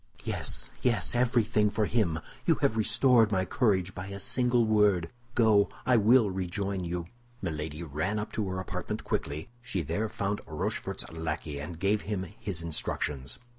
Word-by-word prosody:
"Yes, - - -1
yes, 120 -6 +2
everything 120 -3 +3
for 105 +1 0
him. 100 -8 +1 0.3
You - - +5
have 110 - +3
restored 115 0 +4
my 95 -2 +1
courage 95 -3 +1
by 90 0 -6
a 100 0 -6
single 120 +3 +3
word; 105 -6 +3 0.2
go, 110 -3 +5 0.2
I 125 - +4
will 110 0 +5
rejoin 95 +1 -2
you." 85 0 -3 0.3
Milady 80 -3 -4
ran 80 +7 -2
up 105 +1 -3
to 105 -3 -2
her 95 0 -3
apartment 95 - -4
quickly; 75 +7 -3
she 95 -7 -2
there 105 +9 -1
found 100 +1 -2
Rochefort's - - -3
lackey, 80 -2 -4
and 80 +3 -6
gave 100 +3 +2
him 100 -3 -3 0.2
his 90 -5 -3
instructions. 75 -5 -2
100 Hz, 160 wpm, -29 LUFS, 85-110 Hz, 0.3 s, You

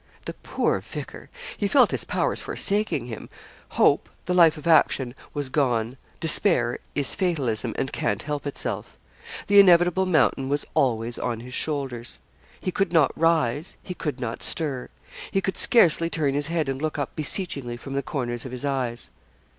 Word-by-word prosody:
The - - -4
poor - - -1
vicar! - - -9 0.3
He 205 - -1
felt 255 +3 +5
his - - -2
powers - - -1
forsaking 210 - -1
him. 115 -3 -8 0.5
Hope, - - +3 0.2
the 180 - 0
life 165 -3 +5
of 150 - -10
action, 145 -6 +3 0.2
was 145 -2 -2
gone. 125 -4 0 0.2
Despair 155 - +1 0.2
is 145 -2 +2
fatalism, 140 - -1
and 135 - -2
can't 105 - -1
help 145 -1 -4
itself. 140 - -5 0.5
The 205 0 +6
inevitable 180 0 +5
mountain 150 -5 +2
was 145 +1 0
always 120 -2 0
on 115 -2 -3
his 125 +1 -10
shoulders. 135 -7 -3 0.4
He 185 - -3
could 195 +1 0
not 160 -6 +4
rise 160 -2 +1
he 180 - -6
could 150 -6 -4
not 120 -3 -4
stir. 140 -6 -1 0.4
He 195 - +1
could 190 0 -2
scarcely 165 -7 +4
turn 150 -5 0
his 145 +1 -1
head 165 -3 -1
and 135 0 -3
look 155 -1 -2
up 145 -3 -3
beseechingly 145 -6 -2
from 135 +3 -8
the 140 - 0
corners 120 -5 -3
of 130 - -7
his 125 +2 -5
eyes. 125 -4 -2
145 Hz, 170 wpm, -25 LUFS, 125-170 Hz, 0.5 s, The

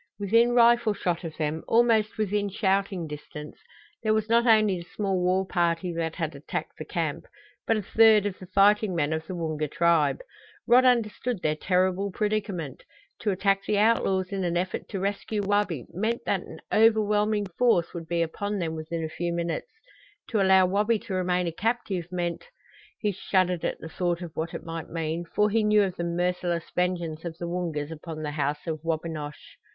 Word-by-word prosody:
Within 230 +4 +3
rifle 235 -2 +5
shot 175 -2 -2
of 160 -2 -7
them, 155 0 -2
almost 225 -2 +3
within 205 -1 0
shouting 195 -2 0
distance, 150 0 -9 0.4
there 215 -1 +2
was 220 0 -1
not 235 +1 +4
only 215 -5 +4
the 170 - -13
small 195 -3 0
war 185 +1 +2
party 175 -1 0
that 165 -1 -2
had 160 -3 -3
attacked 140 - -5
the - - -5
camp, - - -3 0.4
but 225 - +3
a 210 - -3
third 220 0 +5
of 200 -2 -3
the 185 - -10
fighting 200 +1 +3
men 155 -1 +1
of 160 0 -4
the 185 - -5
Woonga 155 -3 -2
tribe! 165 -1 +2 0.5
Rod 250 +2 +6
understood 240 -2 +1
their 155 0 +1
terrible 185 +3 +1
predicament. 200 - -2 0.4
To 215 - -1
attack 195 +1 +1
the 210 - +1
outlaws 200 -4 +2
in 195 -1 -2
an 175 -1 0
effort 180 +1 -3
to 195 - -3
rescue 205 +2 -2
Wabi 200 - 0
meant 220 +6 -2
that - - 0
an - - -11
overwhelming 215 -1 +3
force 230 -9 +3
would 165 -2 -7
be 170 0 +1
upon 205 +5 -3
them 165 -4 -2
within 160 +1 -4
a - - -1
few 170 +2 -3
minutes; 170 -1 -3 0.6
to 215 -4 +1
allow 190 -1 +6
Wabi 210 +5 +2
to 200 - -7
remain 180 -1 +1
a 170 - -1
captive 200 -2 -2
meant 175 -1 -3 0.5
he 210 - 0
shuddered 185 -2 0
at - - -1
the - - -8
thought 175 +1 -2
of 170 - -7
what 160 +1 -3
it - - -6
might 165 -1 -6
mean, 165 +1 -3
for 210 +5 +1
he 225 +1 +2
knew 210 0 +4
of 185 -2 -2
the 170 - -3
merciless 175 0 -1
vengeance 175 -3 -1
of 165 -2 -6
the 170 - -5
Woongas 165 -4 -3
upon 160 0 -7
the 150 - -3
House 145 0 -2
of 160 -2 -3
Wabinosh. 160 -2 -4
185 Hz, 190 wpm, -26 LUFS, 165-210 Hz, 0.6 s, Rod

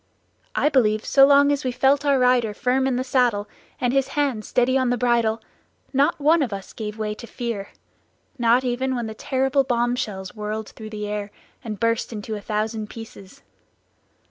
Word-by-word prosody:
I - - +2
believe 220 -7 +2
so 275 0 +6
long 285 0 +5
as 285 0 -1
we 255 - -1
felt 275 +3 +2
our 280 -1 +4
rider 250 -4 +2
firm 260 +3 +1
in 260 - 0
the 255 - -1
saddle, 245 -5 +1 0.3
and 245 0 0
his 270 -1 +2
hand 270 -7 0
steady 250 +3 +1
on 260 -2 +2
the 245 - +1
bridle, 230 -2 +1 0.5
not 285 +5 +2
one 310 +3 +4
of 255 -6 -1
us 195 -1 -7
gave 210 -1 -6
way 215 -1 -2
to 235 +2 -10
fear, 230 -5 -4 0.7
not 240 +2 +4
even 260 +1 -1
when 240 -2 -2
the 220 - -5
terrible 270 +3 +1
bomb 240 -1 0
shells 190 -7 -5
whirled 215 0 -5
through 215 -1 -10
the 210 -1 -5
air 205 0 -4 0.3
and 215 -4 -6
burst 230 +1 0
into 220 0 -5
a 205 - -6
thousand 215 +1 -3
pieces. 225 -4 -11
240 Hz, 190 wpm, -23 LUFS, 215-265 Hz, 0.7 s, so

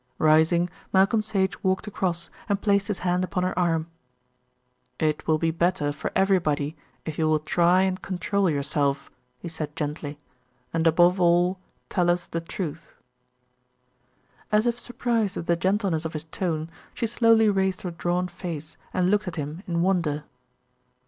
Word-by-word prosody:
Rising, 160 +3 +4 0.2
Malcolm 195 +3 +4
Sage 200 -3 -1
walked 190 -1 +1
across 180 -4 -2 0.2
and 200 -1 +1
placed 200 -1 +2
his 210 -4 -2
hand 180 0 +2
upon 185 0 -1
her 185 - 0
arm. 165 -3 +1 1.1
"It 155 -1 -1
will 155 -1 +4
be 165 +1 +1
better 165 -3 +1
for 145 - -4
everybody 165 -6 +2 0.3
if 160 -1 -5
you 155 -1 +2
will 155 - +4
try 175 +4 +3
and 190 -1 -1
control 195 +1 0
yourself," 140 -1 0 0.3
he - - -8
said 155 -2 -5
gently, 150 -1 -4 0.6
"and 165 0 +2
above 175 +3 +4
all 175 +2 +3 0.3
tell 175 -2 +1
us 175 0 +1
the 165 - -4
truth." 165 -2 -6 1.6
As 210 +1 +3
if 240 0 0
surprised 235 -4 -1
at 165 - -4
the 170 - +2
gentleness 190 -2 0
of 160 - -4
his 155 -1 -3
tone, 160 -1 -3 0.2
she 235 - -1
slowly 225 -1 +4
raised 190 -2 +1
her 180 - -3
drawn 175 +2 -1
face 170 -4 -7 0.2
and 185 0 +2
looked 210 -1 +1
at 175 - -4
him 150 +2 -5
in 170 -1 0
wonder. 170 -6 +1
175 Hz, 160 wpm, -25 LUFS, 160-190 Hz, 1.6 s, Rising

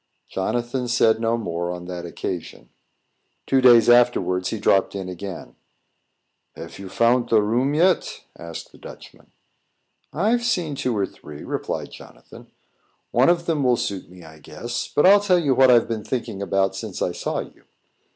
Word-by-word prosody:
Jonathan 120 +6 -2
said 115 -2 +2
no 115 0 +1
more 85 -5 -4
on 90 0 -7
that 90 -1 -6
occasion. 85 -8 -6 0.8
Two 135 -1 +2
days 120 -3 +6
afterwards, 120 -7 +3
he 110 - -3
dropped 100 -1 +2
in 95 -2 -5
again. 90 +1 -8 1.0
"Have - - -10
you 100 -1 -8
fount 120 +4 +1
a 110 - +5
room 120 +7 0
yet?" 180 +3 +1
asked 85 -1 -9
the - - -18
Dutchman. - - -14 0.8
"I've 225 +8 0
seen 180 -10 -1
two 125 -4 -2
or 100 - +1
three," 75 -5 -12
replied - - -4
Jonathan. - - -14 0.6
"One 125 +5 +4
of 170 -1 +1
them 155 -4 0
will 125 -2 +3
suit 100 -5 -4
me, 90 -1 -14
I 80 -1 -14
guess. 100 +11 -6
But 145 - +1
I'll 200 +2 +7
tell 190 -3 +3
you 145 -6 +1
what 130 0 +5
I've 120 -2 +5
been 110 -2 -4
thinking 115 -5 -4
about 95 0 0
since 100 -1 -5
I - - -1
saw - - -3
you. - - -14
115 Hz, 170 wpm, -22 LUFS, 95-130 Hz, 1.0 s, I'll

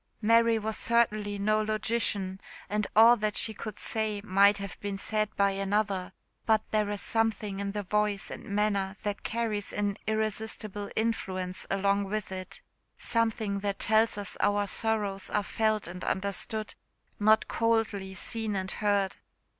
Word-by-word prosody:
Mary 230 +1 +4
was 220 0 -2
certainly 215 -3 +1
no 215 +2 +2
logician, 215 -3 0 0.3
and 210 -1 0
all 230 +3 +8
that 215 -2 -2
she 220 - -1
could 215 0 -7
say 220 -2 -1
might 200 +1 +5
have 200 -2 -7
been 200 -1 -4
said 215 +1 0
by 200 0 +3
another; 195 -1 -1 0.4
but 220 -1 +4
there 215 -1 +1
is 205 -1 -3
something 220 -3 -1
in 200 0 -2
the 205 -1 -3
voice 210 0 0
and - - -7
manner 200 -1 0
that 205 -1 -2
carries 220 -3 -2
an 205 -1 -1
irresistible 215 -1 -2
influence 185 -5 -2
along 200 +1 +2
with 210 0 -3
it 185 -1 -7 0.4
something 220 -3 0
that 200 -1 -2
tells 220 +1 +3
us 205 -2 -3
our 205 0 +2
sorrows 205 -2 0
are 210 - 0
felt 215 0 0
and 180 +1 -7
understood, 200 +2 -1 0.5
not 215 +1 +4
coldly 220 -4 0
seen 220 +2 -2
and 190 0 -1
heard. 200 -2 0
210 Hz, 150 wpm, -29 LUFS, 200-220 Hz, 0.5 s, all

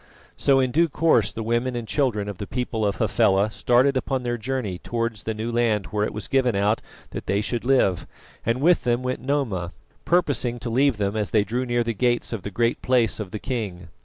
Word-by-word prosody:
So 135 -1 +3
in 130 -1 +1
due 165 +4 +3
course 135 -9 +2
the 115 - -5
women 120 +3 0
and 120 -2 -4
children 115 -8 0
of 100 -3 -6
the 100 - -5
people 125 -3 -2
of 100 - -1
Hafela 100 -1 +2
started 125 +5 +3
upon 130 0 -1
their 120 -1 -1
journey 115 -6 -3
towards 115 -1 -3
the 110 - -3
new 110 +2 -3
land 115 -4 +1
where 105 -1 0
it - - -1
was 105 - -6
given 125 -4 +2
out 105 +3 +1 0.3
that - - -7
they 100 - +1
should 115 +2 -2
live, 120 -9 +2 0.4
and 115 +3 0
with 175 +3 +4
them 120 +1 +1
went 130 0 -2
Noma, 115 -11 -1 0.3
purposing 145 -8 +1
to 120 0 -5
leave 135 0 +3
them 100 0 -1
as 105 -2 -1
they 105 -2 +3
drew 120 +5 -2
near 120 0 +1
the 115 0 -2
gates 120 +2 0
of 110 - -4
the 100 - -5
Great 115 +4 0
Place 120 -4 +2
of 105 -3 -4
the 105 - -5
king. 100 -8 -4
115 Hz, 220 wpm, -24 LUFS, 105-130 Hz, 0.4 s, with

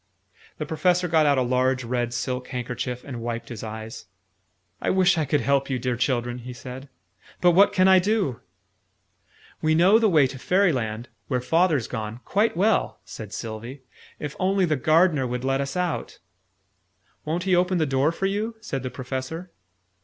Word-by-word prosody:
The 155 - -3
Professor 180 +3 +1
got 160 -2 +3
out 140 -1 +3
a 130 - +3
large 130 +1 +1
red 120 0 -1
silk 125 +1 -3
handkerchief, 125 0 -4
and 125 -4 -7
wiped 115 0 -4
his 115 -3 -7
eyes. 110 -1 -7 0.7
"I - - 0
wish 185 -1 +4
I 160 -2 0
could 145 0 +1
help 140 +3 +1
you, 130 - 0
dear 125 0 -1
children!" 120 0 -1
he 125 +1 -8
said. 130 +3 -9 0.5
"But 180 - +5
what 195 +4 +5
can 185 0 +3
I 190 -1 +7
do?" 190 - 0 1.2
"We 155 0 +2
know 190 +7 +6
the 220 -2 +3
way 155 -6 +5
to 130 0 -5
Fairyland 125 - +1 0.2
where 125 -3 0
Father's 160 -1 +2
gone 110 -1 -5
quite 205 -2 +1
well," 205 +3 +1
said 105 -3 -9
Sylvie: 115 +5 -7 0.3
"if 150 -1 -6
only 190 0 +2
the 155 -3 +1
Gardener 155 -1 +3
would 125 +1 -4
let 135 +1 +1
us 140 +4 -4
out." 180 -2 -2 1.1
"Won't 165 +3 -2
he 185 -1 +2
open 180 +1 +2
the 160 - +2
door 135 +2 +2
for 195 - -3
you?" 210 +4 -1
said 140 - -4
the 130 - -4
Professor. 130 +8 -5
140 Hz, 175 wpm, -24 LUFS, 125-180 Hz, 1.2 s, I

